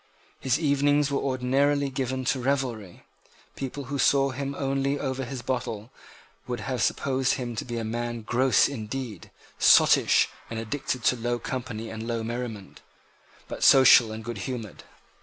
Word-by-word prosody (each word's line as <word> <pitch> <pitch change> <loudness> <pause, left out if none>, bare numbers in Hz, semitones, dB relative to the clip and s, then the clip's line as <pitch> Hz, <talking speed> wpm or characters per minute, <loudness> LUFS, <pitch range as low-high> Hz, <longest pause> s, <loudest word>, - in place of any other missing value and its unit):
His 130 +3 0
evenings 145 -1 +2
were 140 - 0
ordinarily 140 +2 +1
given 130 0 -3
to 130 - 0
revelry. 125 -8 -2 0.5
People 140 +1 -5
who 140 +2 -5
saw 135 0 +3
him 140 +1 -4
only 135 +1 -1
over 135 -1 -3
his 125 -1 -7
bottle 120 -3 -4 0.6
would 120 -3 -4
have 125 0 -3
supposed 130 +1 +1
him 120 -3 -5
to - - -2
be 120 -1 -5
a 115 - -3
man 120 +1 -4
gross 125 +1 +3
indeed, 115 -4 -6 0.3
sottish, - - +5 0.2
and 115 - -5
addicted 125 +2 -3
to 125 - +3
low 120 0 -2
company 115 -2 -5
and 110 0 -6
low 115 -1 -2
merriment, 115 -3 -6 0.7
but - - -6
social 130 -4 +7
and 110 0 -7
goodhumoured. 120 -1 -6
125 Hz, 150 wpm, -26 LUFS, 115-135 Hz, 0.7 s, social